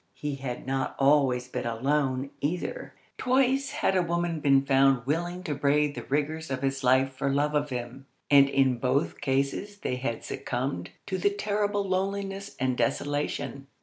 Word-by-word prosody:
He 145 -2 -4
had 130 -2 -5
not 135 0 -2
always 135 -3 +3
been 125 - -4
alone, 135 +2 0
either. 180 - -3 0.2
Twice 265 +1 +2
had 190 - 0
a 185 - +4
woman 170 -1 -1
been 140 -2 +4
found 135 -2 +4
willing 175 +5 -2
to 155 - -2
brave 145 +1 +2
the - - -6
rigours 155 +3 -1
of 130 0 -3
his 135 0 -1
life 130 +1 +3
for 135 +1 -1
love 145 +2 +1
of 150 0 +1
him, 125 +1 -6 0.2
and 140 -1 +7
in 135 -3 +2
both 130 +3 0
cases 140 +9 -1
they 125 -10 -3
had 120 -3 -3
succumbed 120 -8 -3 0.2
to 190 -1 -3
the 200 - +3
terrible 205 0 -1
loneliness 195 +1 -2
and 130 0 +1
desolation. 145 -1 -2
140 Hz, 165 wpm, -27 LUFS, 135-175 Hz, 0.2 s, and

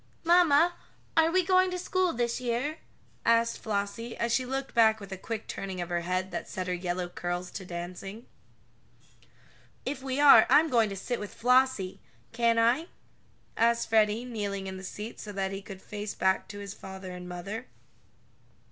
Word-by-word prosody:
"Mamma, 340 -1 +5 0.4
are 325 0 +5
we 370 +2 +3
going 370 0 +4
to 365 - -3
school 370 0 +1
this 235 0 -1
year?" 250 +6 -1 0.4
asked 230 0 +3
Flossie, 215 +2 -3
as 235 0 0
she 255 -1 +1
looked 270 +1 -3
back 220 -1 +5
with 200 -1 -10
a - - -3
quick 220 +3 -5
turning 190 -2 -5
of 175 0 -4
her 175 -1 0
head 185 +2 -2
that - - -5
set 185 - -4
her 180 - -1
yellow 180 0 -2
curls 175 0 -4
to 190 - -7
dancing. 180 +6 -7 1.6
"If 270 0 -3
we 265 +1 -2
are, 290 -1 +8
I'm 320 +2 +6
going 230 -3 +4
to 195 - -5
sit 240 +5 -3
with 205 - -6
Flossie 250 -5 +2 0.3
can't 230 0 +2
I?" 240 +9 +3 0.7
asked 235 0 +2
Freddie, 220 +1 +3
kneeling 205 -5 -3
in 190 0 -5
the 190 - -9
seat 210 +4 -7
so 210 - -7
that 195 -1 -2
he 195 0 -5
could 195 -1 -10
face 210 0 -5
back 190 0 +1
to 205 - -9
his 200 -1 -6
father 190 -2 -9
and 180 0 -8
mother. 195 +7 -6
220 Hz, 180 wpm, -29 LUFS, 190-250 Hz, 1.6 s, are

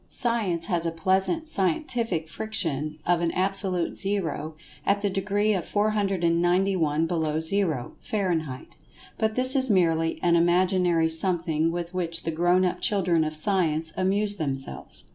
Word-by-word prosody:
Science 210 -9 +1
has 175 -4 -1
a - - -1
pleasant 190 - +1
"scientific 195 - -1
friction" 155 -8 -3
of 175 -1 +2
an 170 - +1
Absolute 185 -2 0
Zero 165 -6 -2 0.3
at 200 +1 +1
the 200 - +1
degree 205 +2 0
of 185 -4 -1
491 180 -5 +1
below 160 -2 -1
Zero, 160 -6 +1
Fahrenheit, 165 -10 -3 0.4
but 220 0 0
this 255 +1 +2
is 265 -1 +3
merely 165 -4 +2
an 170 -1 +4
imaginary 175 -1 +2
something 165 -1 +1
with 175 +1 -5
which 170 -2 -3
the 165 - -2
grown 175 +3 +2
up 180 - -2
children 180 -5 +2
of 155 0 -3
Science 160 -2 0
amuse 200 +2 0
themselves. 135 - -4
175 Hz, 140 wpm, -25 LUFS, 165-200 Hz, 0.4 s, an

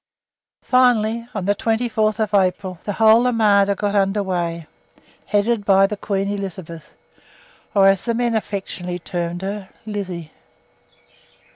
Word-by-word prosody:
Finally, 235 -2 +2
on 195 -3 -3
the 200 - +3
24th 220 -1 0
April, 185 -1 -3
the 205 - -2
whole 225 +3 +5
armada 205 -4 +3
got 205 +1 -2
under 200 0 +1
weigh, 170 -3 -3 0.6
headed 210 +1 +1
by 195 -1 +5
the 210 - -2
Queen 200 -1 -2
Elizabeth, 185 -5 -6 0.9
or 195 -1 +6
as 195 -1 +2
the 235 -1 0
men 240 0 0
affectionately 190 -4 -4
termed 175 0 -4
her, 195 0 -5 0.2
"Lizzie." 185 -7 -5
200 Hz, 125 wpm, -20 LUFS, 190-220 Hz, 0.9 s, or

